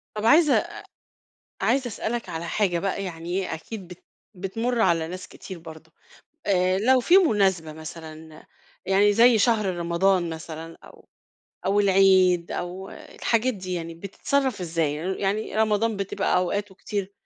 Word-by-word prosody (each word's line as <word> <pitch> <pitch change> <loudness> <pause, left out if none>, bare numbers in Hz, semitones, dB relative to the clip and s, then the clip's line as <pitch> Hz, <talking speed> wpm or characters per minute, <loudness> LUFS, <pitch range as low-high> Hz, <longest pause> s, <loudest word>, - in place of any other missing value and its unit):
طَب 210 - -3
عايزة 300 +5 +6
أ - - 0 0.9
عايزة 265 -2 +1
أسألك 235 +1 -4
على 165 +1 -5
حاجة 175 -1 0
بقى 195 +1 -2
يعني 175 +1 -4
أكيد 185 +3 -8
بت 180 -1 -13 0.3
بتْمُر 225 +6 -2
على 165 -4 +2
ناس 185 +2 -7
كتير 185 -3 -10
برضو، 160 -1 -12 0.5
آآ، 185 -1 +2
لو 255 +4 +4
في 350 +9 +5
مناسْبة 190 - +2
مثلًا 160 0 -10 0.4
يعني 200 +2 +4
زي 235 +1 +6
شهر 220 -1 +2
رمضان 175 +1 +1
مثلًا 160 0 -8
أو - - -17 0.6
أو 200 +2 +3
العيد 190 -3 +4
أو 185 +2 -5
الحاجات 230 +2 -1
دي 185 -2 -5
يعني، 165 -1 -5
بتتصرف 215 +6 -2
إزاي؟ 165 -4 -1
ي 180 +5 -3
يعني 205 +2 -1
رمضان 220 0 +1
بتبقى 195 -1 -1
أوقاته 190 +2 -1
كتير 200 0 -4
190 Hz, 145 wpm, -25 LUFS, 170-215 Hz, 0.9 s, عايزة